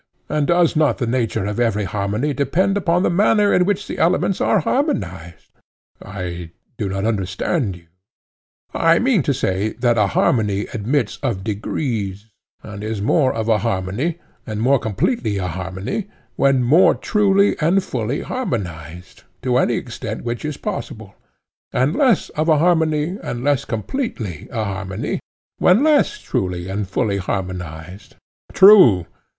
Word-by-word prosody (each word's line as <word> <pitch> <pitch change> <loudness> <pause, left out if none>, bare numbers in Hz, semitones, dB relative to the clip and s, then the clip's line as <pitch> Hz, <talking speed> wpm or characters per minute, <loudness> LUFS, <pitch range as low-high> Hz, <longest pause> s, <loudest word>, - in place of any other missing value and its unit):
And 150 -2 0
does 170 -1 +3
not 155 -1 +2
the 125 - -1
nature 115 -4 -1
of 105 +2 -3
every 115 -3 +1
harmony 105 +8 -2
depend 175 +9 +1
upon 180 -2 +1
the - - +2
manner 205 +3 +3
in 180 - +3
which 205 +1 -1
the - - -6
elements 180 +3 +1
are 210 - +3
harmonized? 90 - -2 0.5
I 90 -3 -6 0.3
do 100 -3 -2
not 95 +1 -2
understand 100 - -1
you, 90 - -14
he - - -31 0.9
said. - - -3
I 165 0 +5
mean 240 -6 +2
to 140 - 0
say 105 -5 -1
that 120 -1 +1
a 105 - +3
harmony 105 0 +1
admits 115 +2 -1
of 95 - -2
degrees, 105 -1 -3 0.3
and 105 -1 -8
is 110 -1 -3
more 130 +6 +2
of 110 -1 -3
a 110 -2 +3
harmony, 115 - -2 0.3
and 105 -2 -4
more 130 +4 +3
completely 110 - -1
a 95 - -2
harmony, 95 - -4 0.3
when 135 -2 +3
more 155 +10 +5
truly 200 -2 +2
and 175 +5 +2
fully 125 - -3
harmonized, 90 - -5 0.2
to 125 -1 +1
any 120 - +2
extent 115 -2 -5
which 120 0 -4
is 150 -1 -4
possible; 130 - -6 0.6
and 135 +5 +1
less 255 - +2
of 155 +2 -1
a 155 - +5
harmony, 160 +1 +1
and 120 0 -5
less 145 -2 +1
completely 115 - -4
a 115 -3 -2
harmony, 95 +1 -4 0.4
when 190 +9 +4
less 310 +6 +3
truly 90 - -3
and 100 +1 -3
fully 100 +1 0
harmonized. 90 -2 -6 0.4
True. 185 - +7
115 Hz, 155 wpm, -20 LUFS, 100-165 Hz, 0.9 s, True